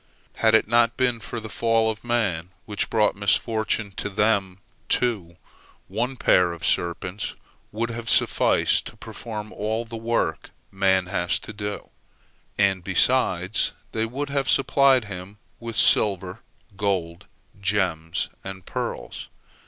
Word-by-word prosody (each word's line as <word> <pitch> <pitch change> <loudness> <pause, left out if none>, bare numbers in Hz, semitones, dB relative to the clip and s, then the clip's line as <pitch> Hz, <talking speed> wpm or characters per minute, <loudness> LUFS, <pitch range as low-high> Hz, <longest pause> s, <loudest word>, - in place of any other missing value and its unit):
Had 110 -1 +4
it 110 - +3
not 115 0 +3
been 125 -3 +1
for 115 +1 -6
the 110 - -7
fall 115 +1 +2
of 110 - -10
man, 105 -9 0 0.2
which 105 -1 -2
brought 105 -2 +2
misfortune 110 +1 +1
to - - -2
them, 100 -2 +1 0.3
too, 100 -9 0 0.5
one 120 +7 -2
pair 90 -6 +4
of 85 -1 -6
serpents 90 +3 -1 0.4
would 115 +2 -2
have 115 0 -5
sufficed - - +3
to - - -11
perform 110 -2 -7
all 110 +3 -2
the 115 0 -8
work 115 +1 -1 0.2
man 95 -1 +2
has 90 0 0
to 110 - -9
do, 105 -1 -5 0.7
and, 95 -3 +2
besides, 95 -1 +2 0.2
they 110 0 -1
would 140 +5 -4
have 135 -2 0
supplied 135 -3 +4
him 95 0 -8 0.2
with 115 -1 -6
silver, 95 -3 +3 0.4
gold, 95 -4 -2 0.3
gems, 90 -5 0 0.2
and 95 -1 -8
pearls. - - -5
105 Hz, 135 wpm, -24 LUFS, 95-115 Hz, 0.7 s, Had